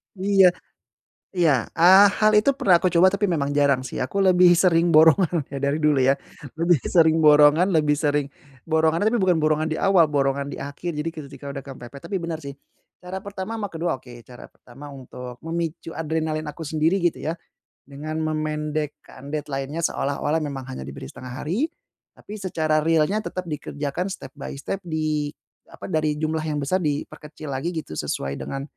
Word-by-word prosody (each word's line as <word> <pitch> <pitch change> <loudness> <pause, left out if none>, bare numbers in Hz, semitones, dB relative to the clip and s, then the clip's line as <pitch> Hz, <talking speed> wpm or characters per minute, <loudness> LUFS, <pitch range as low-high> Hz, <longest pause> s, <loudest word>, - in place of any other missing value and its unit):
Iya. 195 0 +4 0.8
Iya, 160 - +2 0.2
eee, 190 +4 +8
hal 215 0 +5
itu 215 +7 +4
pernah 185 -3 +5
aku 180 +1 +2
coba 175 +1 +5
tapi 200 +2 -1
memang 145 -7 0
jarang 140 -2 +3
sih, - - -3
aku 200 +10 -3
lebih 180 -2 +5
sering 170 -1 +3
borongan 160 0 +4 0.2
dari 140 +2 +1
dulu 150 -1 +3
ya, 135 - +5 0.5
lebih 170 +1 +4
sering 160 -2 +3
borongan, 150 +5 +6
lebih 150 -3 +2
sering 145 -1 0 0.4
borongan 160 +1 +2
tapi 235 - +2
bukan 185 -6 +2
borongan 155 0 +1
di 155 - -2
awal, 180 -6 +4
borongan 140 0 0
di - - -7
akhir 145 +5 -5
jadi 150 0 -4
ketika 140 -4 -8
udah 140 -1 -6
kepepet, 135 0 -11
tapi 195 -2 -3
benar 165 -2 -5
sih 140 - -6 0.5
cara 190 +2 -7
pertama 200 +2 -6
sama 205 -3 -4
ke-2 165 -2 -2
oke, 125 -1 -14 0.2
cara 125 -1 -12
pertama 140 +4 -13
untuk 125 -2 -10
memicu 165 0 -4
adrenalin 160 -1 -2
aku 160 -1 -8
sendiri 160 +5 +1
gitu 175 -1 -1
ya 160 - -1 0.5
dengan 155 +3 -5
memendekkan 150 -3 -4
deadline-nya 145 +1 -4
seolah-olah 145 +2 -1
memang 140 -3 -5
hanya 65 - -7
diberi 65 - -8
1/2 130 +2 -8
hari 200 - 0 0.5
tapi 210 +1 -10
secara 160 -5 0
realnya 165 +5 +2
tetap 185 -3 -5
dikerjakan 145 +3 -4
step-by-step 150 -1 -6
di 155 -2 -1 0.4
apa, - - -10
dari 155 -1 +1
jumlah 155 +1 -2
yang 150 -2 -2
besar 185 +7 0
diperkecil 150 -1 -5
lagi 155 +7 -3
gitu 145 - -5
sesuai 70 0 -3
dengan 135 0 -5
155 Hz, 165 wpm, -23 LUFS, 145-175 Hz, 0.8 s, eee